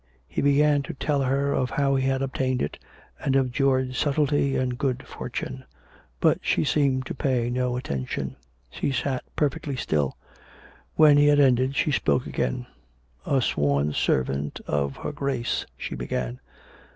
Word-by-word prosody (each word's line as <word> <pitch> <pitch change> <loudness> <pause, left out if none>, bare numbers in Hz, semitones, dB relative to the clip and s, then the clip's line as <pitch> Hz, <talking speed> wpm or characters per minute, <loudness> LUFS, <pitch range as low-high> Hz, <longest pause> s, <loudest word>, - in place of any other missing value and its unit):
He - - -2
began 145 +1 +4
to 140 - -7
tell 145 0 0
her 140 +2 +1
of 125 - 0
how 140 -1 +1
he 135 0 +1
had 135 0 +1
obtained 130 -1 -1
it, - - -4 0.4
and 135 - +1
of 130 -2 +2
George's 130 -1 +1
subtlety 145 -1 +1
and 125 -1 0
good 130 0 -2
fortune; 130 +1 -6 0.6
but - - +3
she - - +1
seemed 140 -3 +1
to - - -4
pay 125 -3 0
no 125 0 0
attention. 65 - -3 0.4
She 140 - -2
sat 130 0 -1
perfectly 145 -1 -1
still. 75 - -1 0.8
When 150 -2 +7
he 145 - +5
had 145 0 +5
ended, 130 -1 +3
she 150 - +1
spoke 75 - +1
again. - - -2 0.3
" 65 0 -35
A 135 -3 +2
sworn 70 -3 +1
servant 70 +2 0
of 70 -1 -1
her - - -4
Grace 140 -5 -2
" - - -38
she - - -5
began. 60 0 -3
130 Hz, 165 wpm, -25 LUFS, 120-140 Hz, 0.8 s, When